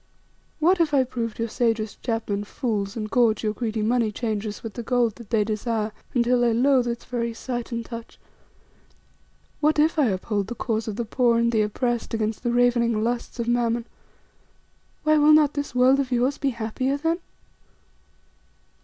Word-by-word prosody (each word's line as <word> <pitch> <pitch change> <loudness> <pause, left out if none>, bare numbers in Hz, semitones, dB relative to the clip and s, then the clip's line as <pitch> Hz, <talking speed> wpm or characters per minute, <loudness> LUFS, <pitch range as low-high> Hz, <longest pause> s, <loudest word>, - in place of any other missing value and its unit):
What 345 +3 +3
if 300 -3 +2
I 265 - +5
proved 235 -3 -4
your 230 - -1
sagest 225 -2 -1
chapmen 220 -4 -2
fools, 205 -2 -3
and 215 -1 -3
gorge 225 -1 +2
your 215 -1 0
greedy 220 -1 -2
moneychangers 220 -2 -1
with 225 -2 -6
the 240 - -5
gold 240 -1 +1
that 235 -4 -12
they 220 -3 +2
desire 215 0 -2 0.2
until 245 0 +3
they 235 -2 +3
loathe 255 0 +3
its 235 0 -4
very 235 -2 -3
sight 240 0 -5
and 230 -1 -3
touch? 230 -1 -9 1.4
What 305 +1 +2
if 315 +2 +3
I 280 - +4
uphold 200 0 -1
the 240 - -5
cause 225 -1 -2
of 215 - -3
the 235 +1 -3
poor 235 +1 +2
and 235 0 +2
the 220 -2 +2
oppressed 235 +2 -1
against 220 -1 -2
the 240 - -1
ravening 235 -2 +2
lusts 240 +1 -2
of 235 - -2
Mammon? 240 -1 +1 1.2
Why, 310 0 +4
will 300 +1 +6
not 300 -2 +5
this 285 -3 -4
world 255 +2 +5
of 265 -2 -1
yours 250 +3 +1
be 280 - +1
happier 250 +3 -2
then?" 330 +3 0
235 Hz, 175 wpm, -24 LUFS, 220-250 Hz, 1.4 s, will